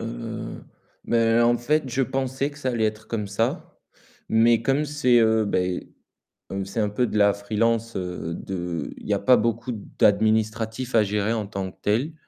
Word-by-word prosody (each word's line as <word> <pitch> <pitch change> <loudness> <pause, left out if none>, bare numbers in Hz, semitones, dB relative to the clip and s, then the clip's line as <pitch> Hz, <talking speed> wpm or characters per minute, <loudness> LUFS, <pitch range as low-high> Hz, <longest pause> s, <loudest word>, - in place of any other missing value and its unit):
Heu, - - -6 0.4
mais 115 0 +3
en 120 0 +4
fait 150 +5 +1
je 130 +2 0
pensais 135 +2 -1
que 145 - -14
ça 130 - -2
allait 115 -3 0
être 110 0 -2
comme 105 -3 -2
ça, 105 +3 -2 0.5
mais 115 +1 +4
comme 135 +4 +1
c'est, 145 -5 +3
heu, 110 -1 +3
beh, 90 -2 -1 0.6
comme 95 0 -3
c'est 100 +4 -4
un 105 - +1
peu 120 +4 0
de 105 - -2
la 100 -1 +5
freelance, 115 +3 -1
heu, 90 -2 -4
de 90 -3 -4
il - - -11
y 105 - +1
a 100 - +1
pas 130 -1 +5
beaucoup 115 +2 -1 0.3
d'administratifs 110 +3 +1
à 110 - +6
gérer 105 +2 0
en 110 -3 -2
tant 95 -2 -4
que - - -28
tel. 120 +10 0
110 Hz, 185 wpm, -24 LUFS, 100-120 Hz, 0.6 s, à